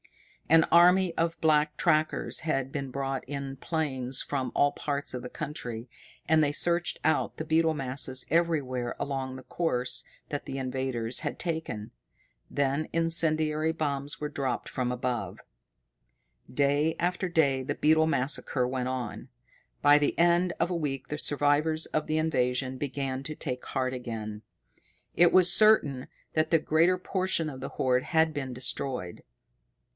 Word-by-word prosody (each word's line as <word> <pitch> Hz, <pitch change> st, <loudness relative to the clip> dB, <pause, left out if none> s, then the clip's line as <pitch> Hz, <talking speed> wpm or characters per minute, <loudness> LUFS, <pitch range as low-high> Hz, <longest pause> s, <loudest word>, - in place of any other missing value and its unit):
An 165 Hz, +1 st, +7 dB
army 180 Hz, +1 st, +5 dB
of 165 Hz, 0 st, -1 dB
black 150 Hz, -1 st, +2 dB
trackers 155 Hz, 0 st, +1 dB
had 135 Hz, -5 st, -1 dB
been 140 Hz, -2 st, -4 dB
brought 135 Hz, 0 st, -3 dB
in 140 Hz, 0 st, -5 dB
planes 135 Hz, -5 st, -2 dB
from 135 Hz, -3 st, -3 dB
all 145 Hz, 0 st, +4 dB
parts 145 Hz, -1 st, -3 dB
of 125 Hz, -, -4 dB
the 125 Hz, -, -7 dB
country, 125 Hz, -7 st, -6 dB, 0.4 s
and 160 Hz, -1 st, +4 dB
they 145 Hz, -, +2 dB
searched 170 Hz, +3 st, 0 dB
out 160 Hz, -, +1 dB
the 155 Hz, -, -4 dB
beetle 160 Hz, 0 st, +2 dB
masses 130 Hz, -1 st, +1 dB
everywhere 140 Hz, -7 st, 0 dB
along 135 Hz, -2 st, -3 dB
the 130 Hz, -, -9 dB
course 125 Hz, -7 st, -2 dB, 0.3 s
that 145 Hz, -, -4 dB
the 135 Hz, -, -5 dB
invaders 130 Hz, -3 st, -2 dB
had -, -, -3 dB
taken. 160 Hz, -11 st, -4 dB, 0.6 s
Then 140 Hz, +2 st, -1 dB
incendiary 160 Hz, -2 st, +2 dB
bombs 145 Hz, -3 st, -3 dB
were 150 Hz, -, -2 dB
dropped 135 Hz, -4 st, -3 dB
from 125 Hz, -1 st, -2 dB
above. 125 Hz, 0 st, -3 dB, 1.1 s
Day 145 Hz, +3 st, +2 dB
after 180 Hz, +2 st, -1 dB
day 140 Hz, -6 st, +2 dB
the 145 Hz, +2 st, -3 dB
beetle 160 Hz, +1 st, +3 dB
massacre 130 Hz, -3 st, 0 dB
went 125 Hz, 0 st, -2 dB
on. 130 Hz, 0 st, -5 dB, 0.5 s
By 145 Hz, +1 st, +7 dB
the 145 Hz, -, 0 dB
end 175 Hz, +1 st, +4 dB
of -, -, +1 dB
a -, -, 0 dB
week 135 Hz, -5 st, -3 dB
the 150 Hz, -, -3 dB
survivors 145 Hz, +3 st, +1 dB
of 155 Hz, -, -2 dB
the 155 Hz, -, 0 dB
invasion 130 Hz, -4 st, 0 dB
began 135 Hz, -1 st, -3 dB
to 155 Hz, +2 st, -6 dB
take 125 Hz, -5 st, -5 dB
heart 130 Hz, -1 st, -1 dB
again. 110 Hz, -4 st, -5 dB, 0.7 s
It 175 Hz, 0 st, +6 dB
was 180 Hz, -1 st, +6 dB
certain 170 Hz, -13 st, +4 dB, 0.3 s
that 155 Hz, 0 st, +1 dB
the 165 Hz, -, +4 dB
greater 165 Hz, +4 st, +3 dB
portion 185 Hz, -3 st, -1 dB
of 130 Hz, -3 st, -9 dB
the 135 Hz, -, -4 dB
horde 125 Hz, -1 st, +1 dB
had 160 Hz, -1 st, +2 dB
been 135 Hz, -3 st, -4 dB
destroyed. 125 Hz, -6 st, -4 dB
145 Hz, 150 wpm, -28 LUFS, 130-160 Hz, 1.1 s, An